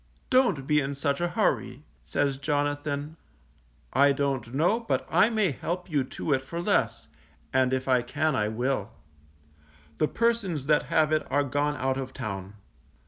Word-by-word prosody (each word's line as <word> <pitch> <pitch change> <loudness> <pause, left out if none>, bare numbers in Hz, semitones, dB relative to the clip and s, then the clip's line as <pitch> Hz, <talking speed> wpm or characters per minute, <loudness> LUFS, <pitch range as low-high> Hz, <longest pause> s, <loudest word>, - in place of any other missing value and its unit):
Don't 250 - +3
be 150 +1 +3
in 140 +1 -3
such 140 +2 -1
a 175 - +2
hurry, 145 - -1 0.2
says 140 -2 -1
Jonathan, 145 +1 -2 0.8
_I 140 +1 +5
don't 135 -5 -1
know 170 - +2
but 230 - -1
I 220 - +5
may 215 -7 +1
help 175 +6 -4
you 145 -3 +2
to 140 +3 -2
it 130 - +1
for 170 +5 -6
less, 115 - 0 0.5
and 130 -1 +3
if 130 0 -1
I 130 -2 +4
can 150 +5 0
I 105 -3 +1
will; 120 -1 -2 1.1
the 155 - +3
persons 220 - 0
that 150 +1 +2
have 155 -1 +3
it 155 0 +2
are 145 +1 +2
gone 145 +2 0
out 130 0 0
of 130 -1 -5
town. 100 -1 -6
145 Hz, 165 wpm, -27 LUFS, 130-160 Hz, 1.1 s, I